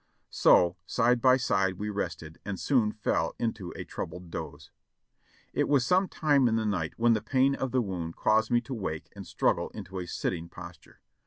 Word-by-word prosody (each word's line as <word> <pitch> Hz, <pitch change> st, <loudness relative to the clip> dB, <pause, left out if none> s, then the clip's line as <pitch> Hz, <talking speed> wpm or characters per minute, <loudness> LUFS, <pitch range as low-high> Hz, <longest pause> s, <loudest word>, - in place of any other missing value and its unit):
So 90 Hz, 0 st, +4 dB
side 120 Hz, +3 st, +2 dB
by 130 Hz, +1 st, +6 dB
side 95 Hz, -7 st, +1 dB
we 105 Hz, +2 st, -3 dB
rested, 80 Hz, -5 st, -5 dB
and 100 Hz, -2 st, -5 dB
soon 120 Hz, -7 st, +2 dB
fell 80 Hz, -6 st, -1 dB
into 110 Hz, -6 st, -3 dB
a -, -, -5 dB
troubled 90 Hz, -1 st, -7 dB
doze. -, -, -7 dB, 0.8 s
It -, -, +1 dB
was 140 Hz, -4 st, +3 dB
some 185 Hz, +7 st, +3 dB
time 145 Hz, -7 st, +2 dB
in 110 Hz, -, +1 dB
the 110 Hz, -1 st, 0 dB
night 90 Hz, -7 st, -2 dB
when 115 Hz, 0 st, +4 dB
the 110 Hz, -, 0 dB
pain 130 Hz, +4 st, +2 dB
of 130 Hz, -1 st, -2 dB
the 130 Hz, -2 st, +2 dB
wound 85 Hz, -5 st, -4 dB
caused 110 Hz, +1 st, +2 dB
me 120 Hz, -1 st, +3 dB
to 130 Hz, +3 st, -7 dB
wake 85 Hz, -9 st, -4 dB
and -, -, -9 dB
struggle 85 Hz, -, 0 dB
into 95 Hz, -2 st, -6 dB
a 90 Hz, -, -5 dB
sitting 85 Hz, 0 st, -3 dB
posture. 85 Hz, -2 st, -12 dB
105 Hz, 190 wpm, -28 LUFS, 90-125 Hz, 0.8 s, by